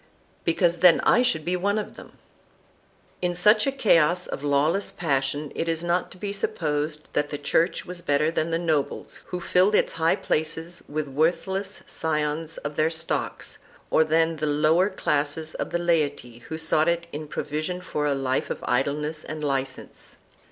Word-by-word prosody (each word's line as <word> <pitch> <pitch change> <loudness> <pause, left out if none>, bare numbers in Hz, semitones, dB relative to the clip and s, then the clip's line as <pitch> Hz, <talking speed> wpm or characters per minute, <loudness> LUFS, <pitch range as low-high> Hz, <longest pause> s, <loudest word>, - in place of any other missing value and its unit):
"Because 170 +1 +2
then 175 0 +6
I 240 - +4
should 245 -12 +1
be 180 - +1
one 200 +3 0
of 215 - -4
them."2 - - -12 1.1
In 175 -1 0
such 210 +6 +5
a - - +2
chaos 180 - +3
of 135 - -6
lawless 145 +7 +2
passion 145 -2 -1
it 165 - -2
is 165 0 -1
not 175 +1 0
to - - -13
be 200 +1 -4
supposed 150 -5 -1
that 145 0 0
the 145 - -4
Church 160 +4 +1
was 180 0 -5
better 150 -1 +1
than 165 0 -1
the 165 - +1
nobles 160 -4 -2
who 180 - -4
filled 180 +4 +3
its - - +2
high 165 0 +2
places 160 +2 -2
with 150 0 -2
worthless 190 +7 -1
scions 155 0 -2
of 145 0 -6
their 155 +1 +3
stocks, 165 0 -3 0.3
or 160 - +5
than 160 +1 +2
the 155 0 -1
lower 155 +6 +3
classes 155 -3 -1
of - - -4
the - - 0
laity 150 -8 0
who 160 - -4
sought 160 0 +2
in 170 0 +1 0.2
it 150 - -12
provision 155 +6 -3
for 150 -5 -2
a 140 - +1
life 130 -1 -1
of - - -5
idleness 150 +4 -1
and 155 0 -6
licence. 135 -2 -4
160 Hz, 175 wpm, -25 LUFS, 150-175 Hz, 1.1 s, then